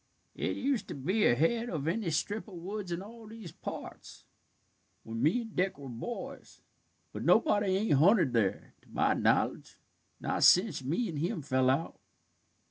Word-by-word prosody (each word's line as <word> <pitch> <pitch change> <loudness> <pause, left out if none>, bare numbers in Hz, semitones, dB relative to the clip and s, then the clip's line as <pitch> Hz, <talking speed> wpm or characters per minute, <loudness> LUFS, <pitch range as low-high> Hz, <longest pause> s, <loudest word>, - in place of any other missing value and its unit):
"It - - -2
used 270 -3 -1
to - - -6
be 185 +11 +1
ahead 225 - +2
of 155 -4 -3
any 190 +2 -1
strip 205 +8 -2
of 200 - -11
woods 190 +2 -6
in 170 +2 -3
all 225 +1 -12
these 215 -6 -10
parts, - - -9 0.8
when 115 0 -5
me 160 - +3
and 225 -3 -10
Dick 190 +1 0
was 140 -3 -8
boys. 230 - -7 0.5
But - - -5
nobody 205 -9 +3
ain't 210 -4 +1
hunted 175 - +4
there, 110 -5 0
to - - -25
my - - +2
knowledge, - - 0 0.4
not - - -2
sence 180 -7 +5
me 170 - -1
and 160 -6 -4
him 170 0 -2
fell 130 -2 +2
out." 140 +6 -1
180 Hz, 165 wpm, -31 LUFS, 145-215 Hz, 0.8 s, sence